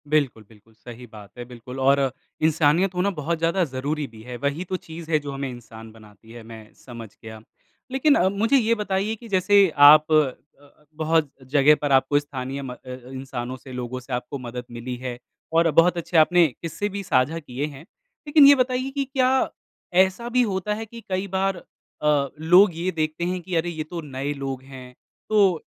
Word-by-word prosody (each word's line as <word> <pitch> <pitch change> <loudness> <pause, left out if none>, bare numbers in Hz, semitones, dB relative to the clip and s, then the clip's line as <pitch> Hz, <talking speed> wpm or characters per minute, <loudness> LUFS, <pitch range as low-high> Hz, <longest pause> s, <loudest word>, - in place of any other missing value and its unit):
बिल्कुल, 140 -7 0
बिल्कुल 110 0 -21
सही 120 +2 -12
बात 105 -2 -14
है 120 - -6
बिल्कुल 125 +1 -10
और 135 0 +3 0.3
इंसानियत 160 +4 +2
होना 180 +3 +1
बहुत 165 +3 -1
ज़्यादा 170 +3 +1
ज़रूरी 145 +2 -3
भी 110 -2 -15
है। 125 +1 -7
वही 140 +7 -2
तो 190 - -1
चीज़ 165 -2 -9
है 155 - +3
जो 145 -1 -7
हमें 135 0 -4
इंसान 115 -2 -11
बनाती 110 0 -18
है, 120 -1 -11
मैं 110 -1 -12
समझ 115 -3 -11
गया। 110 -1 -10 0.5
लेकिन 275 +3 +3
अ, 185 - +3
मुझे 225 +7 +2
ये 230 -2 +2
बताइए 210 0 -2
कि 230 +1 -13
जैसे 195 0 +4 0.2
आप 155 0 +7 0.9
बहुत 160 -1 +1 0.2
जगह 145 +1 +5
पर 145 -1 -1
आपको 135 +2 +3
स्थानीय 140 -1 -6
म 135 -2 -6
अ - - -8
अ, 125 -1 -9
इंसानों 130 -1 -6
से 130 +1 -13
लोगों 125 0 -5
से 125 - -9
आपको 125 +3 -4
मदद 125 0 -7
मिली 120 +1 -6
है 125 -1 -6 0.4
और 165 0 +4
बहुत 170 +3 +4
अच्छे 170 0 -1
आपने 170 +2 +5
किस्से 175 +5 -3
भी 200 0 -5
साझा 145 0 +1
किए 140 -2 -5
है। 140 -2 -11 0.5
लेकिन 295 -1 +6
ये 285 - +8
बताइए 255 0 0
कि 280 -1 -1
क्या 260 0 +1 0.5
ऐसा 190 +6 -1
भी 250 +1 +2
होता 205 -2 -1
है 220 +1 -5
कि 230 +1 -12
कई 190 +1 -2
बार 190 +1 -1
अ, 150 -4 -2
लोग 180 +5 +6
ये 175 +3 -2
देखते 155 0 -3
हैं 180 0 -2
कि 180 +1 -5
अरे, 165 +1 0
ये 160 -2 -4
तो 165 +2 -7
नए 140 -1 -4
लोग 135 -2 -5
हैं, 130 -2 -12 0.4
तो 195 -6 +3
150 Hz, 195 wpm, -23 LUFS, 125-185 Hz, 0.9 s, ये